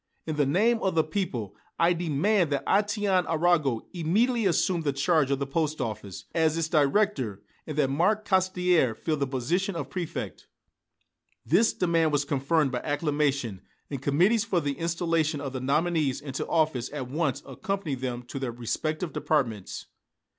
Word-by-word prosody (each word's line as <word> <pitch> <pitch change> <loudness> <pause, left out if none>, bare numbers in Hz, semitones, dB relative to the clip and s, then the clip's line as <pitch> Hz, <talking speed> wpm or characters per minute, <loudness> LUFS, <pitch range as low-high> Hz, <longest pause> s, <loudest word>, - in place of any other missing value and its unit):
In 155 - -3
the 145 -2 +2
name 220 +10 +3
of 190 -3 0
the 160 - +4
people, 135 - -3 0.2
I 170 +1 +4
demand 175 +3 +1
that 140 -1 -1
Étienne 205 -2 +2
Arago 160 -7 +2
immediately 210 +7 +2
assume 175 0 +1
the 145 -3 0
charge 145 0 +2
of 140 - +1
the 140 - -2
post 155 +2 -1
office, 100 -5 -5
as 160 -1 +2
its 165 -1 0
director, 145 - +1 0.2
and 155 -2 -5
that 135 -3 +2
Marc 205 +9 +1
Caussidière 180 - +2
fill 160 - -1
the 140 -1 -1
position 170 +10 -1
of - - -5
Préfect." 175 -4 -5 1.0
This 225 - +4
demand 165 -3 +2
was 145 -1 +1
confirmed 140 +1 +1
by 125 - -1
acclamation, 145 - -1 0.3
and 140 -3 -4
committees 180 +11 +3
for 195 -5 +1
the 145 -3 -1
installation 165 -1 0
of 135 -2 -5
the 130 - -4
nominees 150 0 +1
into 135 -2 -5
office 155 -7 +1
at 140 -4 -5
once 140 -1 -1
accompanied 195 -10 -3
them 125 -1 -3
to 130 +3 -7
their 130 -3 -2
respective 155 +7 -3
departments. 115 -11 -1
155 Hz, 160 wpm, -27 LUFS, 135-175 Hz, 1.0 s, the